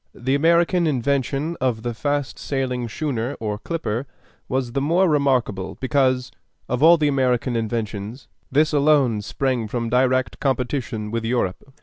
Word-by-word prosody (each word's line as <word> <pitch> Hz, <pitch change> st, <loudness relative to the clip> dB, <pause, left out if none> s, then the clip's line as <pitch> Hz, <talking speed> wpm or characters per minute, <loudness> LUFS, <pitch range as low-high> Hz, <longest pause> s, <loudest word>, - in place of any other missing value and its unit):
The 130 Hz, +2 st, -1 dB
American 170 Hz, +3 st, +3 dB
invention 140 Hz, +3 st, 0 dB
of 120 Hz, -4 st, 0 dB
the 120 Hz, -1 st, -2 dB
fast 145 Hz, +3 st, -2 dB
sailing 125 Hz, -3 st, -2 dB
schooner 135 Hz, -1 st, -2 dB
or 105 Hz, -2 st, -3 dB
clipper 135 Hz, -4 st, -3 dB, 0.4 s
was 130 Hz, -2 st, -1 dB
the 135 Hz, +2 st, -1 dB
more 170 Hz, +6 st, +3 dB
remarkable 130 Hz, -, 0 dB
because, 130 Hz, -1 st, +1 dB, 0.4 s
of 125 Hz, +1 st, -2 dB
all 165 Hz, +2 st, +8 dB
American 130 Hz, -4 st, +1 dB
inventions, 110 Hz, +1 st, -3 dB, 0.2 s
this 150 Hz, +3 st, +3 dB
alone 140 Hz, -7 st, +3 dB
sprang 125 Hz, +1 st, -1 dB
from 115 Hz, +1 st, -3 dB
direct 130 Hz, -1 st, +1 dB
competition 125 Hz, -5 st, -2 dB
with 115 Hz, 0 st, -2 dB
Europe. 120 Hz, +1 st, -2 dB
130 Hz, 135 wpm, -22 LUFS, 115-145 Hz, 0.4 s, all